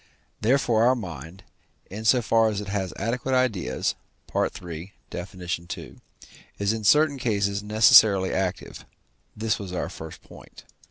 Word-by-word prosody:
Therefore 115 -1 +2
our 125 +2 +4
mind, 85 - -8 0.5
in 110 +3 -7
so 125 +1 +4
far 115 0 +3
as 105 -2 -3
it 105 -1 -6
has 95 -2 -2
adequate 125 +5 -1
ideas 105 - 0 0.4
(III. - - +2 0.6
Def. 90 +3 -7
ii.), 85 -1 -6 0.6
is 100 +1 0
in 110 -1 -5
certain 150 +4 +4
cases 100 -4 0
necessarily 105 -2 +5
active; 95 0 -3 0.5
this 110 0 -1
was 100 -3 -7
our 90 - -3
first 80 0 -10
point. - - -15
105 Hz, 140 wpm, -25 LUFS, 95-115 Hz, 0.6 s, necessarily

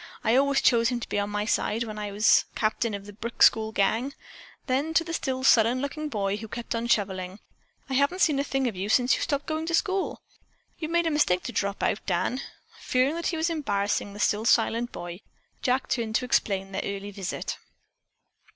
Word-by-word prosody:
I 225 +2 +3
always 280 +1 +3
chose 230 -1 +4
him 245 -1 -1
to - - -5
be - - 0
on 205 0 -1
my 210 0 -2
side 225 +1 0
when 215 -2 -6
I 205 -1 -4
was 210 +2 +4
captain 220 0 0
of 200 0 -8
the 205 - -10
Brick 230 +3 -1
School 220 -1 +5
gang." 225 +7 0 0.5
Then 290 +4 -1
to 330 - +5
the 335 0 -6
still 260 -5 -2
sullen 240 -1 +5
looking 300 +3 -4
boy, 200 -5 -1
who 220 +1 -7
kept 235 +2 -5
on 230 0 -2
shoveling: 190 -4 0 0.5
"I 270 - -5
haven't 280 +8 +2
seen 295 -5 +3
a - - +1
thing 270 -2 -1
of 225 - -3
you 190 +3 -3
since 245 +3 +4
you - - -5
stopped 285 -1 -1
going 315 +1 -3
to 335 - +2
school. 385 +1 -1 0.6
You 315 - -4
made 340 0 +2
a 325 - +1
mistake 185 -12 +2
to - - -4
drop 200 0 -2
out, 205 - 0
Dan." 200 +8 0 0.4
Fearing 255 +3 +1
that 335 +1 -2
he 335 - -1
was 320 +2 0
embarrassing 205 -9 -1
the 205 - -10
still 210 +1 +1
silent 235 0 +2
boy, 175 +1 -7 0.4
Jack 255 +1 +1
turned 225 -3 -1
to 250 - +1
explain 195 -5 0
their - - -2
early 200 0 -5
visit. 195 -2 -4
235 Hz, 215 wpm, -26 LUFS, 205-280 Hz, 0.6 s, School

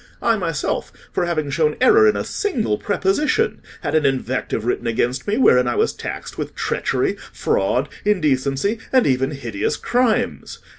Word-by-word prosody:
I 230 - +2
myself, 165 -7 -2 0.2
for 175 - -1
having 155 -4 -1
shown 150 0 +1
error 425 +12 +6
in 430 - +3
a - - -1
single 235 - -1
preposition, 205 +8 0 0.2
had - - -3
an 155 -1 +3
invective 130 -4 -1
written 120 0 -1
against 120 +2 -1
me 210 +2 +1
wherein 125 - +5
I 120 - 0
was - - +1
taxed - - -7
with - - -5
treachery, - - -1
fraud, 125 +8 0 0.2
indecency, 155 - +1
and 260 -2 +4
even 135 0 +1
hideous 120 -8 -3
crimes. 245 -2 0
150 Hz, 155 wpm, -21 LUFS, 130-215 Hz, 0.2 s, error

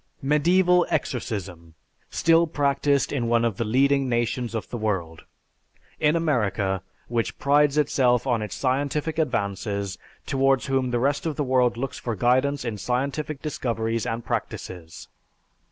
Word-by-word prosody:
Medieval 175 +5 +3
exorcism 90 -9 -3 0.3
still 165 0 +3
practised 140 -2 +1
in 125 -5 -1
one 115 0 +2
of 110 -4 -1
the - - 0
leading 135 +4 +2
nations 120 0 -1
of 110 - -3
the 120 - -3
world! 90 -7 -3 0.7
In 150 +1 +3
America, 105 - 0 0.3
which 115 -1 -2
prides 145 +1 +3
itself 125 -5 +2
on 120 -4 +1
its 105 -4 -5
scientific 145 +4 -1
advances, 100 - -2 0.3
towards 135 -1 +2
whom 135 -2 0
the 120 - 0
rest 140 +6 0
of 155 - -2
the 145 - -1
world 125 -3 +2
looks 135 +2 -4
for 120 -2 -3
guidance 130 +6 +1
in 110 -3 -3
scientific 140 +6 -2
discoveries 115 -6 -2
and 115 +1 -3
practices! 85 -2 -5
125 Hz, 140 wpm, -25 LUFS, 110-140 Hz, 0.7 s, Medieval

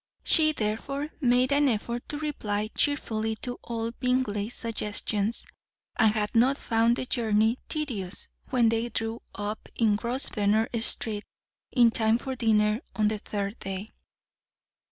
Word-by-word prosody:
She, 310 -2 +6
therefore, 275 +5 -3
made 255 0 +3
an 285 0 +4
effort 235 +1 -3
to 295 - -2
reply 215 -9 -2
cheerfully 220 -7 0
to 245 -1 -4
all 230 -1 -3
Bingley's 245 -4 -1
suggestions, 215 -1 -1 0.5
and 220 -2 +4
had 210 -1 -1
not 255 +4 +4
found 230 -1 +2
the 255 - -3
journey 225 -1 +1
tedious 215 - -4 0.2
when 240 -3 +3
they 230 +1 0
drew 225 +1 -3
up 205 +1 -5
in 220 -3 +3
Grosvenor 225 -3 +1
Street 215 -2 +1 0.5
in 240 -3 +5
time 220 0 +3
for 265 +2 -5
dinner 215 -2 +2
on 215 -1 +2
the 215 -1 -3
third 200 +1 -4
day. 195 +2 -5
225 Hz, 135 wpm, -27 LUFS, 210-250 Hz, 0.5 s, She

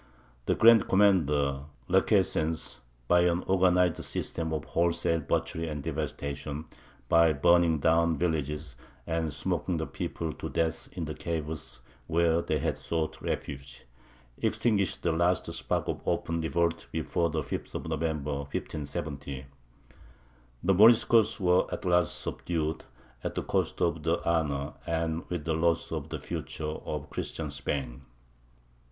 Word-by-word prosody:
The - - +3
Grand 115 -2 +7
Commander, 75 -9 +3 0.2
Requesens, 80 -5 +1 0.3
by 90 - +5
an 85 0 +2
organized 90 -2 +3
system 80 -1 -2
of 80 -2 -2
wholesale 85 -1 +1
butchery 80 +2 -1
and 75 -2 -5
devastation, 75 0 -4 0.4
by 85 +1 +5
burning 85 +2 +4
down 80 +1 +3
villages, 75 -3 -2 0.3
and 80 -1 -1
smoking 85 +5 -1
the 80 - -2
people 80 0 -4
to - - -6
death 80 -1 -1
in 85 -3 -3
the 75 - -4
caves 80 -5 -4 0.3
where 85 0 +3
they - - 0
had - - -1
sought 80 -1 -2
refuge, 70 -3 -5 0.5
extinguished 100 -6 +1
the 85 - +2
last 85 +2 +2
spark - - -1
of - - -3
open 85 0 0
revolt 85 +1 0
before 85 +1 0
the 80 0 -1
5th - - -5
of - - -4
November, 75 -2 -1
1570. 70 -1 -5 1.2
The 95 - +4
Moriscos 110 +2 +6
were 90 -1 +3
at - - -4
last 90 -2 +2
subdued, 80 -2 -3 0.4
at - - -3
the - - -1
cost - - -1
of 85 -2 +1
the 80 +2 +1
honour, 75 -4 0
and 80 0 -1
with 85 -4 -3
the 80 - 0
loss 85 +1 +1
of - - -4
the - - -3
future, 80 - -6
of 75 -1 -5
Christian 75 -3 -4
Spain. 70 -2 -3
80 Hz, 135 wpm, -29 LUFS, 75-85 Hz, 1.2 s, Grand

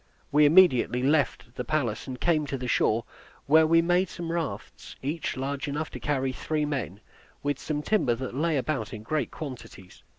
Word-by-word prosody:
We 150 +1 +6
immediately 145 -7 +5
left 140 -4 +1
the - - -4
palace, 140 -9 -1
and 130 -1 -6
came 155 -4 +1
to 140 - -3
the 125 -1 -5
shore, 115 -1 +2 0.4
where 160 +2 +5
we 165 +1 +5
made 175 +2 +2
some 170 -1 -5
rafts, 170 -2 -5
each 150 +1 -3
large 140 +2 -3
enough 150 +2 -3
to - - -7
carry 135 -3 -1
three 150 +3 -2
men, 120 - -4 0.4
with 145 0 -1
some 150 -1 -3
timber 170 - +2
that 130 +1 -5
lay 155 +3 +1
about 135 -2 -2
in 105 - -9
great 145 +2 -1
quantities. 115 - -9
145 Hz, 185 wpm, -27 LUFS, 125-155 Hz, 0.4 s, We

